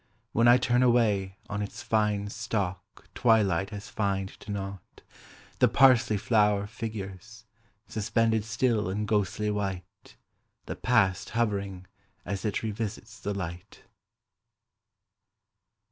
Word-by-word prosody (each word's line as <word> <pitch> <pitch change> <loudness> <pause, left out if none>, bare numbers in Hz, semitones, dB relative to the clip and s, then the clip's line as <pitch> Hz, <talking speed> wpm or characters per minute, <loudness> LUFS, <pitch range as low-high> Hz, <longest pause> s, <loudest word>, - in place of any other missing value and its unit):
When 115 +1 +3
I 120 +1 +8
turn 125 0 +2
away, 105 -6 +2
on 105 0 -3
its 100 - -6
fine 105 -2 +1
stalk 100 -5 -4
Twilight 100 -6 +3
has 105 -1 -8
fined 100 -2 -1
to - - -13
naught, 100 -2 -6 0.6
the - - +6
parsley 125 -5 +5
flower 105 -1 +2
Figures, 110 -1 -7 0.4
suspended 110 +1 +1
still 115 -2 0
and 105 +3 -2
ghostly 105 0 0
white, 95 -3 -5 0.5
The - - -5
past 105 -7 +2
hovering 100 -5 -1 0.4
as 100 -2 -4
it 105 0 -1
revisits 110 -1 -5
the 100 0 -3
light. 90 +1 -7
105 Hz, 115 wpm, -28 LUFS, 100-110 Hz, 0.6 s, I